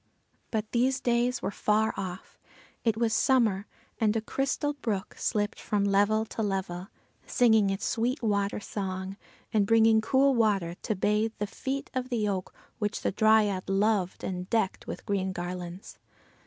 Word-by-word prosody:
But 220 -1 -2
these 255 +2 +2
days 240 +1 +1
were - - -1
far 215 +2 +1
off. 185 -1 -7 0.4
It 225 -2 +1
was 225 -1 +1
summer, 220 -6 +2 0.3
and 220 -1 +2
a 225 - +1
crystal 275 +5 -1
brook 215 -9 -3
slipped 205 0 -1
from 205 -3 0
level 205 +2 +3
to 225 - -5
level, 190 -3 -2 0.4
singing 220 -4 +4
its 195 0 -2
sweet 245 +3 -1
water 200 -2 0
song, 190 -2 -4 0.4
and 205 -2 +3
bringing 225 0 +5
cool 270 +4 +3
water 205 -8 +2
to 215 - -1
bathe 210 +3 +1
the 205 - -1
feet 270 +7 -4
of 255 -1 -2
the 225 -4 0
oak 190 -2 -2 0.3
which 210 +1 -2
the - - +1
Dryad 210 -2 +3
loved 195 -1 +1
and 180 -1 -4
decked 220 -5 0
with - - -6
green 190 -3 -1
garlands. 180 +1 -6
210 Hz, 155 wpm, -28 LUFS, 195-225 Hz, 0.4 s, bringing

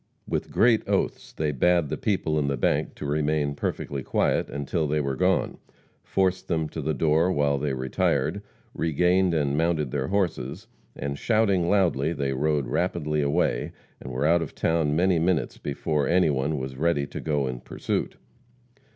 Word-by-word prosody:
With - - -2
great 115 -2 +4
oaths - - -1
they 75 -1 -1
bade 85 +2 +2
the - - -1
people 80 -7 0
in 70 - 0
the 70 -1 -1
bank - - 0
to - - -7
remain 75 0 0
perfectly 70 -1 -3
quiet - - 0
until 70 +3 -2
they 75 +1 0
were 70 -2 -1
gone, - - +1 0.4
forced 95 -1 0
them 80 -3 0
to - - -5
the 80 - -1
door 80 +5 +2
while 70 -4 +1
they 70 -1 -1
retired, 65 +7 0 0.3
regained 90 +3 +2
and 70 -2 +1
mounted 80 -4 0
their 65 -1 -1
horses, 90 -9 -2 0.3
and, 70 0 -4
shouting 100 -6 +2
loudly, 85 -7 +2
they 70 -4 -1
rode 75 +1 0
rapidly 75 -3 -1
away, 70 0 0 0.3
and 65 - -7
were 65 +4 -1
out 85 +2 +4
of 80 - -6
town 80 -3 +1
many 90 +1 +3
minutes 85 0 0
before 70 +1 -1
any 85 -2 +3
one 70 +3 -1
was 65 0 -5
ready 75 -2 +1
to - - -7
go 75 -3 0
in 65 -1 -4
pursuit. - - -3
75 Hz, 170 wpm, -26 LUFS, 70-85 Hz, 0.4 s, great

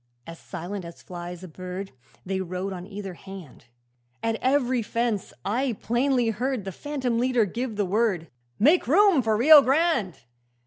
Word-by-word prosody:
'As 165 0 -10
silently 180 +1 -6
as 170 - -13
flies 175 0 -8
a - - -7
bird, 185 +3 -7 0.3
They 190 0 -2
rode 185 +2 -4
on 180 0 -8
either 200 -2 -7
hand; 190 -8 -12 0.6
At 225 0 0
every 260 -2 +2
fence 230 -2 -2
I 245 +5 0
plainly 245 0 +1
heard 245 0 -2
The 195 - -4
phantom 260 -1 -2
leader 250 -2 +2
give 235 +3 -4
the 205 -1 0
word, 195 -4 0 0.3
"Make 300 - +4
room 365 +1 +5
for 220 -2 +1
Rio 295 +5 +9
Grande!" 270 - +1
220 Hz, 160 wpm, -25 LUFS, 185-255 Hz, 0.6 s, Rio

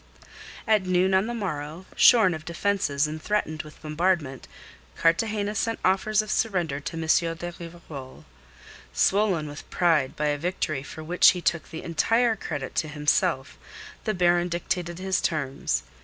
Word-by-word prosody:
At 215 -3 +3
noon 185 +1 +2
on 190 +3 +3
the 240 - -3
morrow, 165 -4 -5
shorn 220 -7 +6
of 155 -1 -6
defences 170 -4 0
and 155 +1 -5
threatened 160 -7 -1
with 155 0 -14
bombardment, 155 -4 -1 0.5
Cartagena 205 +5 +1
sent 225 +2 -1
offers 210 +3 +2
of 215 - -6
surrender 175 -10 0
to 145 - -6
M. - - -3 0.3
de 175 +1 -6
Rivarol. 155 - -10 0.7
Swollen 190 -6 +2
with 145 0 -10
pride 160 -7 +2
by 150 0 0
a 145 0 -1
victory 155 -4 -2
for 155 +2 -9
which 175 +3 +5
he 180 - -4
took 170 -1 -1
the 160 - -7
entire 225 +8 +2
credit 145 -9 -5
to 155 - +1
himself, 150 -1 0 0.5
the 215 - 0
Baron 175 0 +2
dictated 175 0 -3
his 190 0 -1
terms. 135 - -1
170 Hz, 155 wpm, -26 LUFS, 150-190 Hz, 0.7 s, shorn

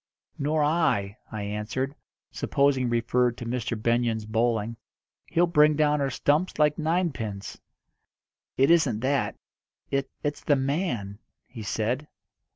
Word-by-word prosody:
"Nor 150 +2 +1
I," 145 -11 +1 0.2
I 110 -1 -4
answered, 105 +7 -3 0.4
supposing 140 -2 +1
he - - 0
referred 120 +1 +1
to 120 - -6
Mr. 120 -1 -2
Benyon's 115 -1 +1
bowling. 115 0 0 0.5
"He'll 175 +1 +3
bring 150 -3 +4
down 150 -1 +2
our 135 - +1
stumps 150 +7 +1
like 150 0 +3
ninepins." 155 - -2 1.0
"It 135 +4 +5
isn't 140 -10 +3
that. 135 +2 0 0.6
It 135 0 0
it's 145 0 -2
the 145 - +3
man," 135 - -2 0.3
he 115 - -10
said. 115 +7 -2
130 Hz, 130 wpm, -26 LUFS, 115-150 Hz, 1.0 s, It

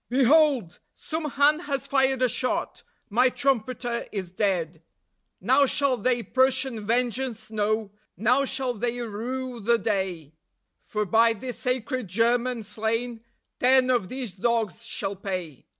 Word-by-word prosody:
"Behold! 265 - +3 0.2
Some 315 -2 -4
hand 290 +4 +3
has 275 -2 -1
fired 265 -1 +2
a - - +5
shot. 250 +1 -2 0.3
My 250 +4 +4
trumpeter 245 -2 -1
is 190 -4 -5
dead. 175 -5 -1 0.6
Now 285 -1 +4
shall 280 -1 +1
they 245 -1 0
Prussian 255 -1 +1
vengeance 240 -1 -1
know; 215 -1 -1 0.3
now 245 +7 +3
shall 260 -2 -2
they 240 +2 -2
rue 240 +3 -4
the 235 +2 +2
day, 190 -9 -2 0.5
For 210 0 -2
by 225 +4 +4
this 245 +2 -7
sacred 250 -1 -2
German 235 +4 +1
slain, 225 +3 -2 0.4
ten 255 0 +4
of 230 -7 0
these 255 -6 -4
dogs 225 +1 -1
shall 200 -3 -3
pay." 185 -7 -6
235 Hz, 135 wpm, -26 LUFS, 210-255 Hz, 0.6 s, a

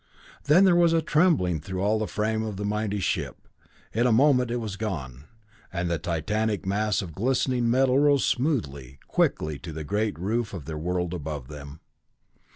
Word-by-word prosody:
Then 155 +7 +6
there 180 -2 +5
was 170 -1 +4
a 165 - +3
trembling 150 - +2
through 95 +3 -4
all 105 +2 +2
the 110 - -2
frame 110 +4 -1
of 110 -3 -4
the 105 - -3
mighty 105 0 -1
ship. 95 - -3 0.5
In 120 +3 +2
a - - +3
moment 125 0 +4
it 120 - -1
was 110 -4 -4
gone, 75 - -5 0.5
and 85 -1 -2
the 85 - 0
titanic 105 +7 -1
mass 100 0 0
of 85 -4 -8
glistening 125 - 0
metal 130 +2 +3
rose 145 -2 +3
smoothly, 70 - -1
quickly 75 -2 0
to 85 - -8
the 80 0 -6
great 105 +2 -1
roof 105 +4 -2
of 80 -7 -8
their 75 0 -5
world 90 +1 -2
above 75 -6 -5
them. 70 0 -10
105 Hz, 180 wpm, -26 LUFS, 85-120 Hz, 0.5 s, Then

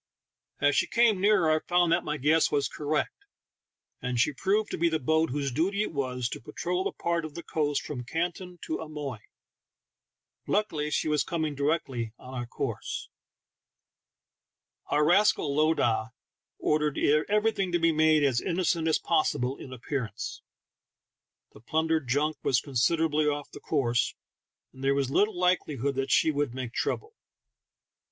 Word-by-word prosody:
As 145 0 +3
she - - +2
came 230 -5 +3
nearer 195 -6 +4
I 155 - +3
found 175 0 +2
that 170 +1 +2
my 150 0 -2
guess 155 +4 +3
was 145 -1 +1
cor 150 - -8
rect, 155 - -1 0.7
and 125 -1 -2
she 145 +5 +3
proved 200 +8 0
to - - -2
be 170 +1 +3
the 160 - +1
boat 160 +3 +1
whose 140 0 -2
duty 190 +10 +1
it - - -5
was 125 -4 -2
to - - -6
patrol 180 +9 -2
the - - -1
part 170 -1 -1
of 155 -2 -7
the 170 - -6
coast 145 -2 -1
from 130 -5 -5
Canton 175 +5 -3
to 160 - -3
Amoy. 150 -7 -6 1.3
Luckily 160 -8 0
she 150 - 0
was 150 -2 +2
coming 160 -4 -2
directly 140 -6 -1
on 130 - -11
our 120 -2 -4
course. - - -4 1.8
Our 150 +1 +2
rascal 175 -4 +3
lowdah 125 -7 +1 0.4
ordered 150 -1 0 0.3
everything 210 -3 +1
to 175 - +3
be 165 -1 +3
made 155 -1 +4
as 130 -4 +2
innocent 170 -2 0
as 160 - +3
possible 135 -5 0
in 130 - -10
appearance; 125 -3 -4 1.1
the - - -14
plundered 160 +2 0
junk 150 +5 +1
was 130 - +2
considerably 150 +3 +1
off 145 -1 -2
the - - -10
course, 120 -6 0 0.6
and 130 - -11
there 135 0 +3
was 135 -2 0
little 205 +5 +2
likelihood 150 -7 +1
that 135 0 -2
she 160 - +4
would 145 -4 -1
make 130 -2 -5
trouble. 435 +1 -2
150 Hz, 160 wpm, -28 LUFS, 135-170 Hz, 1.8 s, nearer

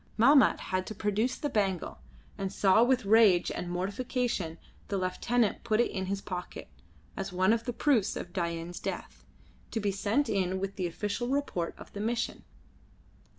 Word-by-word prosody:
Mahmat 270 +5 +6
had 185 0 -2
to 215 - -6
produce 210 +5 0
the 295 - -2
bangle, 195 - -1 0.4
and 195 -1 -3
saw 200 +3 +4
with 250 -2 +2
rage 205 -4 +5
and 175 - -4
mortification 200 -1 -2 0.3
the 200 - -1
lieutenant 205 +5 0
put 215 0 +1
it 240 - +2
in 190 -1 -3
his 195 +1 -2
pocket, 180 -3 -6 0.5
as 195 - -4
one 185 +3 +3
of 230 0 -1
the 245 - -1
proofs 250 -6 +2
of 175 - -6
Dain's 170 -1 -3
death, - - -6 0.5
to 225 - -2
be 205 -2 0
sent 210 +8 0
in 190 -2 0
with 195 +1 -4
the 185 -2 -1
official 210 +7 -3
report 260 -11 -1
of - - -13
the 205 - -6
mission. 230 +3 -2
200 Hz, 170 wpm, -30 LUFS, 185-230 Hz, 0.5 s, Mahmat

